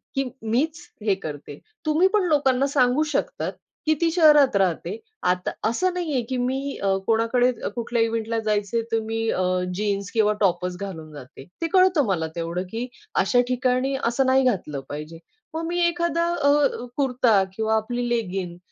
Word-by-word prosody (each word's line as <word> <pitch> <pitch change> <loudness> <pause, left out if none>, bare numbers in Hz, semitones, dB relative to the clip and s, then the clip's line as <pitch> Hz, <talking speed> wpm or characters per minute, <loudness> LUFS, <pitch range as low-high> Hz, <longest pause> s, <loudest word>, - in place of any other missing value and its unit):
की 270 - +1 0.2
मीच 275 +9 0 0.3
हे 200 -3 +3
करते. 145 -5 -8 0.3
तुम्ही 315 +5 +4
पण 420 - +3
लोकांना 275 -3 +3
सांगू 270 +1 +3
शकतात, - - -1 0.3
की 310 - +4
ती 335 - +3
शहरात 300 - +5
राहते 190 - 0 0.3
आता 180 0 +1 0.2
असं 365 +11 0
नाहीये, 315 -8 -1
की 260 - -1
मी 265 +3 -2
अ, 195 -1 +2
कोणाकडे 230 +3 +3 0.2
कुठल्या 235 0 -1
इव्हेंटला 225 0 -1
जायचंय 215 +1 0
तर 225 - +2
मी 225 0 -2
अ, 185 - 0 0.3
जीन्स 200 -1 -2
किंवा 215 -2 +3
टॉपच 180 -2 +1
घालून 160 -6 -6
जाते. 135 -1 -11 0.2
ते 330 - +1
कळतं 370 -6 +5
मला 175 -6 0
तेवढं, 170 +2 -3
की 235 +2 -3 0.3
अशा 245 +6 +3
ठिकाणी 255 +2 +1
असं 240 +3 +1
नाही 260 +1 +4
घातलं 180 - 0
पाहिजे. 155 +3 -7 0.3
मग 325 +1 -3
मी 350 +1 -1
एखादा 340 -1 0 0.2
अ, 285 -3 +3
कुर्ता 250 -7 +3
किंवा 220 +1 +1
आपली 240 +3 -1
लेगिंग 190 -6 -2
235 Hz, 160 wpm, -24 LUFS, 195-275 Hz, 0.3 s, शहरात